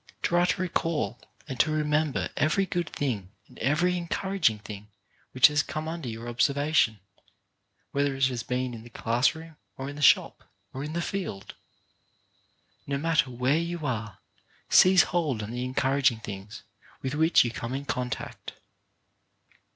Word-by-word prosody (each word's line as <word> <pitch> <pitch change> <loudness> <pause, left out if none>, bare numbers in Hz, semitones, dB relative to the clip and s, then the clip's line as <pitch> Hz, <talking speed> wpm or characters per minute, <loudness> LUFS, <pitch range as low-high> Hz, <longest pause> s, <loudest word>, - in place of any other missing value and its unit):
Try 175 +1 +3
to 180 0 0
recall 165 -3 -1 0.3
and 130 -4 -6
to 155 - +4
remember 150 -1 0
every 155 +6 +2
good 175 -2 -2
thing 110 -10 -3 0.2
and - - -16
every 155 +8 +2
encourag 180 -1 +1
ing 110 - -6
thing 105 0 -9 0.4
which 130 - +5
has 150 -1 +5
come 155 +2 -5
under 160 -5 -4
your 115 +1 -7
observation, 135 -1 +2 0.9
whether 140 -1 0
it 135 0 +3
has 125 -2 -1
been 125 +1 -2
in 115 - -8
the 120 - -13
class 120 +4 +1
room, 160 -1 -11 0.2
or 135 +1 -5
in - - -10
the 145 - -7
shop, 140 - +4 0.3
or 135 - -5
in 150 +1 -5
the 170 +1 -1
field. 175 - -5 1.3
No 140 0 -1
matter 165 -1 +1
where 125 +5 +1
you 170 -2 -4
are, 110 -6 -3 0.5
seize 185 0 +7
hold 150 -11 -1
on 105 - -6
the 125 +1 -3
encouraging 130 -2 +1
things 100 0 -8 0.4
with 130 0 -2
which 160 +2 +5
you 120 - -1
come 120 +2 -4
in 140 +1 -5
contact. 125 -3 -4
140 Hz, 160 wpm, -27 LUFS, 120-160 Hz, 1.3 s, seize